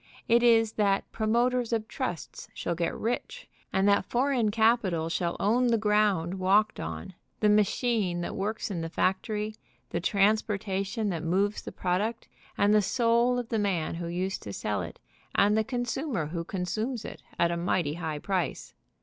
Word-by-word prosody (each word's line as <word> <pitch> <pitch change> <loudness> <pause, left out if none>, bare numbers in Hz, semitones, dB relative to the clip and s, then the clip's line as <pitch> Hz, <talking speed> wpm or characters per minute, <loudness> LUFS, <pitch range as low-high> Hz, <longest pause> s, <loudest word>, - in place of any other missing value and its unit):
It 235 +1 +5
is 225 -2 +5
that 195 -1 +1
promoters 240 +2 +1
of 220 -2 -1
trusts 180 - -5
shall 170 - -2
get 170 0 -2
rich, 235 +2 -3 0.2
and 190 +1 +2
that 200 0 +3
foreign 245 -3 +2
capital 205 -7 +2
shall 170 0 -1
own 240 +5 +3
the 235 -1 +3
ground 210 -4 +1
walked 200 +3 +3
on, 80 - -6 0.3
the 210 - +3
machine 210 -3 +2
that 175 - -4
works 210 +2 -2
in 175 -4 -3
the 165 - -4
factory, 210 +5 -1 0.4
the 170 - -1
transportation 205 +1 +1
that 170 -4 -2
moves 195 +5 0
the - - -7
product, 200 +6 -1 0.3
and 205 +1 +4
the 215 - +5
soul 235 +4 +2
of 245 -2 -3
the 225 - 0
man 185 -6 0
who 170 0 -4
used 185 +3 -2
to - - -7
sell - - -2
it, - - -8 0.4
and 205 +1 +4
the 220 - +3
consumer 245 - -2
who 165 +2 -4
consumes 215 +7 -3
it - - -8 0.2
at 170 0 +3
a - - 0
mighty 170 -3 0
high 160 -2 -4
price. 185 +3 -2
205 Hz, 170 wpm, -28 LUFS, 180-225 Hz, 0.4 s, It